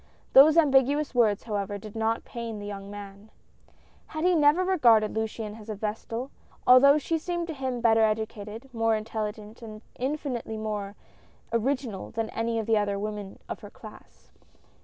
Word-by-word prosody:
These 300 +4 +8
ambiguous 285 -1 +3
words, 220 -5 +2
however, 205 -2 -3
did 210 +1 -11
not 225 0 -1
pain 230 -2 -6
the 205 - -7
young 200 -1 -7
man. 205 +1 -10 0.9
He 320 +4 +2
had 350 - +3
never 300 +5 +4
regarded 235 - +4
Luciane 220 0 -4
as 215 0 -12
a 215 - -3
vestal; 225 +5 -4 0.3
although 280 +3 +7
she 325 +2 -1
seemed 345 +1 -3
to - - -2
him 260 -4 -3
better 225 -1 +4
educated, 220 +3 -2
more 225 -1 +2
intelligent 215 0 -5
and 215 -1 -10 0.2
infinitely 255 -4 -3
more 210 -2 -4 0.6
original 235 -3 -1
than 225 -1 -3
any 230 0 -1
of 220 - -1
the 220 -1 +3
other 205 -1 -1
women 205 -1 -5
of - - -5
her - - -11
class. - - -15
225 Hz, 160 wpm, -27 LUFS, 210-265 Hz, 0.9 s, These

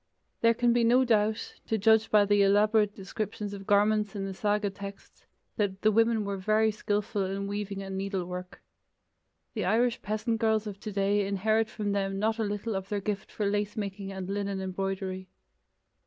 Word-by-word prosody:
There 230 0 +4
can 240 0 +3
be 240 0 +3
no 250 +3 +4
doubt, 215 -2 0
to 220 - +1
judge 220 +1 +4
by 210 -1 +5
the 205 0 +3
elaborate 210 +1 +3
descriptions 205 +1 -5
of 195 -1 -8
garments 210 0 +3
in 195 -1 -3
the 195 - -4
saga 205 +1 0
texts, 200 0 -10 0.3
that 195 -3 -1
the 215 - +5
women 225 0 +3
were 200 0 -2
very 215 +3 +2
skilful 205 -1 -1
in 195 +1 -3
weaving 200 -1 -4
and 190 0 -4
needlework. 180 -2 -5 0.9
The 215 - -2
Irish 230 +5 +2
peasant 220 +2 -2
girls 220 -1 +2
of 200 -2 -6
today 200 -1 0
inherit 215 +3 +1
from 210 -1 -3
them 195 -1 -1
not 220 +3 0
a - - +1
little 205 +1 -2
of 190 0 -4
their 205 - -1
gift 200 0 -4
for 210 - -2
lace 205 +1 -1
making 200 -1 -4
and 190 -1 -5
linen 200 0 -2
embroidery. 190 0 -3
205 Hz, 180 wpm, -29 LUFS, 195-215 Hz, 0.9 s, by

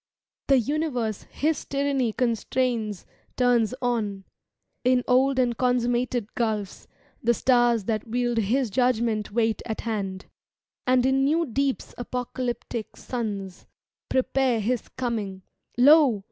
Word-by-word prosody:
The 275 - +5
universe 250 -5 -1
His 310 +2 -1
tyranny 275 -4 0
constrains 235 -3 -1 0.3
Turns 245 -2 +3
on: 210 -5 -1 0.6
In 250 0 +3
old 260 +2 +3
and 245 -2 +2
consummated 245 -2 0
gulfs. 215 -4 -2 0.3
The 235 +1 +2
stars 240 -3 +3
that 215 +2 -2
wield 240 0 0
His 230 +3 +1
judgement 230 -3 +1
wait 225 0 +1
at 220 - -4
hand; 200 -4 -3 0.6
And 255 0 +4
in 265 +1 +3
new 320 +4 +2
deeps 275 +1 -2
apocalyptic 245 -2 -4
sims 200 -7 -5 0.4
Prepare 260 -2 +1
His 235 +3 -1
coming. 215 -7 -3 0.3
Lo! 275 -3 +6
240 Hz, 115 wpm, -25 LUFS, 220-255 Hz, 0.6 s, Lo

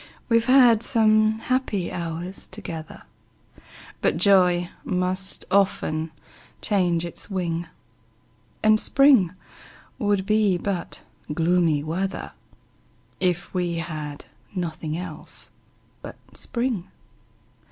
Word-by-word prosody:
We've 230 -1 +3
had 250 -4 +6
some 215 -2 +3
happy 225 -6 -1
hours 170 +2 -5
together, 165 -7 -8 1.0
But - - +2
joy 180 -2 +4
must 185 +1 -1
often 165 -5 +1 0.5
change 175 -5 +1
its 170 - -7
wing; 175 -3 -2 1.0
And 215 0 +5
spring 265 -12 +5 0.7
would 205 -4 +1
be 210 -3 +3
but 185 -1 -4 0.3
gloomy 165 -2 +2
weather, 185 +5 -3 0.9
If 180 0 0
we 175 -2 -1
had 155 -4 -5 0.3
nothing 160 -3 -3
else 175 -4 -8 0.5
but - - -8 0.2
spring. 235 -7 -2
180 Hz, 90 wpm, -24 LUFS, 170-215 Hz, 1.0 s, had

